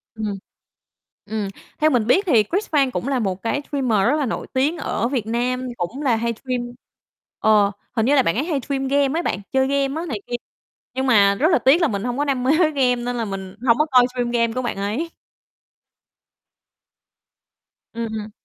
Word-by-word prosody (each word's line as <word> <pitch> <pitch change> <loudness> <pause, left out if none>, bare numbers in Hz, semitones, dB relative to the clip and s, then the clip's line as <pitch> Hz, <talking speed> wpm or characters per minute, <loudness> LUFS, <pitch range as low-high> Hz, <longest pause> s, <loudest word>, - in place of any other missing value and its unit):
Ừm. 210 -2 -3 0.9
Ừm, 210 -1 -3 0.3
theo 310 +1 +4
mình 235 -5 +1
biết 375 +11 +3
thì 230 -9 +5
Cris 390 - -2
Phan 275 -4 +2
cũng 255 - -3
là 270 -2 +1
một 190 -4 -2
cái 280 +5 -1
streamer 255 -8 +1
rất 290 - +3
là 290 - 0
nổi 230 - -4
tiếng 285 +6 +1
ở 235 - -1
Việt 245 -5 -2
Nam, 250 +2 -1
cũng 230 +12 -4
là 255 -5 +2
hay 235 +1 -1
stream 255 -2 -2 0.8
ờ, 210 -2 +4 0.2
hình 225 -1 +2
như 285 +3 +4
là 265 - +5
bạn 165 - +1
ấy 270 - 0
hay 305 -6 -1
stream 270 +1 -2
game 280 +3 +2
ấy 345 - -2
bạn, - - -1
chơi 265 0 +2
game 280 +3 0
á - - -5
này 215 -8 -4
kia, 240 - -3 0.6
nhưng 265 0 -1
mà 200 -4 +5
rất 300 - +2
là - - +4
tiếc 295 +7 +4
là 330 - +4
mình 200 -4 -3
hông 245 +1 -2
có 290 - 0
đam 265 -3 -1
mê 265 - +3
với 315 -3 +4
game, 255 -4 +2
nên 245 0 -3
là 230 - -1
mình 195 -1 -6
hông 230 +1 +5
có 305 - +4
coi 250 -1 +6
stream 245 -1 -2
game 230 -1 +1
của 255 - -2
bạn 240 -5 -3
ấy. 220 +12 -2 2.8
Ừm. 220 -2 -5
250 Hz, 210 wpm, -21 LUFS, 220-275 Hz, 2.8 s, coi